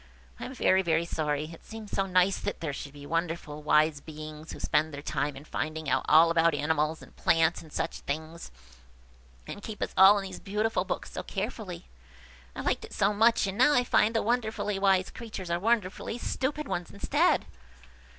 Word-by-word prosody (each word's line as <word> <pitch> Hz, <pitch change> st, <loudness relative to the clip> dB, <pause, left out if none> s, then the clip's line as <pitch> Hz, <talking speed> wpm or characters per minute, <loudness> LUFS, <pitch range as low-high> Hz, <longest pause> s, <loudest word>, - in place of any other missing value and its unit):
I -, -, -5 dB
am 260 Hz, -, -7 dB
very, 190 Hz, -6 st, +3 dB
very 165 Hz, -2 st, +1 dB
sorry! 155 Hz, -1 st, -2 dB
It 165 Hz, -, -14 dB
seemed 220 Hz, -2 st, -9 dB
so 195 Hz, 0 st, 0 dB
nice 185 Hz, +1 st, +3 dB
that -, -, -4 dB
there 155 Hz, -4 st, -3 dB
should 140 Hz, +1 st, -7 dB
be 145 Hz, -1 st, -11 dB
wonderful, 165 Hz, -2 st, -3 dB
wise 150 Hz, 0 st, +3 dB
beings, 155 Hz, 0 st, -9 dB
who -, -, -8 dB
spend 155 Hz, +1 st, +1 dB
their 145 Hz, 0 st, -7 dB
time 145 Hz, -1 st, -2 dB
in 135 Hz, +2 st, -11 dB
finding 155 Hz, -1 st, -4 dB
out 130 Hz, -, +1 dB
all 165 Hz, +2 st, +7 dB
about 165 Hz, -1 st, +3 dB
animals, 150 Hz, +1 st, 0 dB
and -, -, -16 dB
plants, 165 Hz, 0 st, +2 dB
and 160 Hz, -, -15 dB
such -, -, -3 dB
things, 160 Hz, -, -5 dB, 1.0 s
and 205 Hz, -, -8 dB
keep 210 Hz, 0 st, -7 dB
us -, -, -3 dB
all 195 Hz, +2 st, +8 dB
in 200 Hz, -, -2 dB
these 190 Hz, -1 st, -7 dB
beautiful 215 Hz, +3 st, -1 dB
books -, -, -4 dB
so -, -, -4 dB
carefully. -, -, -5 dB, 0.7 s
I -, -, -4 dB
liked -, -, -1 dB
it -, -, -10 dB
so 205 Hz, 0 st, +2 dB
much 225 Hz, +1 st, +4 dB
and 195 Hz, +2 st, -4 dB
now 290 Hz, +3 st, +6 dB
I 245 Hz, -, +4 dB
find 225 Hz, -2 st, +2 dB
the 225 Hz, -, +2 dB
wonderfully 220 Hz, -4 st, -1 dB
wise 195 Hz, -1 st, +3 dB
creatures 205 Hz, -6 st, -7 dB
are 170 Hz, -, +1 dB
wonderfully 220 Hz, +1 st, 0 dB
stupid 280 Hz, +4 st, -2 dB
ones 175 Hz, -6 st, -3 dB
instead." 200 Hz, -, +1 dB
175 Hz, 195 wpm, -28 LUFS, 155-210 Hz, 1.0 s, all